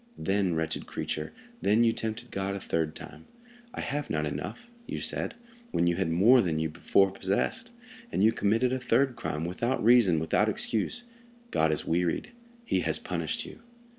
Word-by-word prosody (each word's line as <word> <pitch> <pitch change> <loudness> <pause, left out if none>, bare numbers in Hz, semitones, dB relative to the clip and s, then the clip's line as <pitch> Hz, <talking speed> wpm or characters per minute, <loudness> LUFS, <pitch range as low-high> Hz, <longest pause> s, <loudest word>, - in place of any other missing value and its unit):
Then, 95 -3 +1
wretched 80 0 -2
creature, 75 - -4 0.3
then 110 +4 +4
you 115 - +4
tempted 115 +2 -4
God 95 0 -2
a - - -4
third 80 -3 -1
time. - - -10 0.5
'I - - -3
have 145 0 -3
not 75 0 0
enough,' 160 - -5 0.2
you - - -4
said, - - -3 0.3
when 85 - +1
you 85 0 +2
had 95 -3 0
more 110 +10 +6
than 85 -6 0
you 80 0 0
before 90 +4 +2
possessed, 100 - -1 0.4
and - - +1
you 110 - +6
committed 115 +3 +1
a 130 - -1
third 130 0 +2
crime, 80 -8 -3
without 115 +9 -1
reason, 115 -7 +6
without 80 +1 +2
excuse. 180 - 0 0.5
God 80 0 +2
is 75 - -2
wearied; 85 - 0 0.3
he - - +1
has - - +1
punished - - -3
you." - - -11
100 Hz, 175 wpm, -29 LUFS, 80-120 Hz, 0.5 s, more